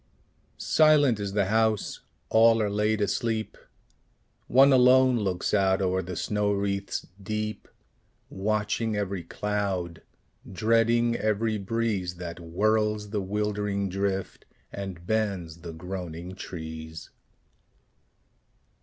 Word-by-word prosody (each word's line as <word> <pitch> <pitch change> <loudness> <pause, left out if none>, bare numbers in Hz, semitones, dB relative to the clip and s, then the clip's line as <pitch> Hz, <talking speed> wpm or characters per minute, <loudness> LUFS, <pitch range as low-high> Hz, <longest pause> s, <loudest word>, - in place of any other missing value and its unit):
Silent 150 -7 +4
is 100 -1 -3
the 100 -1 +2
house: 110 0 +1 0.3
all 115 0 +5
are 105 -2 0
laid 105 +1 +1
asleep: 110 +1 -1 0.9
One 135 +2 +6
alone 130 -1 +5
looks 95 -4 -1
out 95 -2 +3
o'er 95 -1 +1
the 90 0 -6
snow 105 +4 0
wreaths 100 0 -2 0.2
deep, 105 +2 -4 0.6
Watching 105 +2 -1
every 100 -2 -2
cloud, 95 -2 -3 0.5
dreading 115 +4 +2
every 110 0 0
breeze 100 -3 -1
That 85 -1 -7
whirls 105 +4 0
the 105 -2 -1
wildering 105 0 -1
drift, 95 0 -3 0.3
and 95 -3 -7
bends 95 -6 -1
the 85 0 -8
groaning 90 0 -6
trees. 80 -3 -8
100 Hz, 105 wpm, -27 LUFS, 95-110 Hz, 0.9 s, One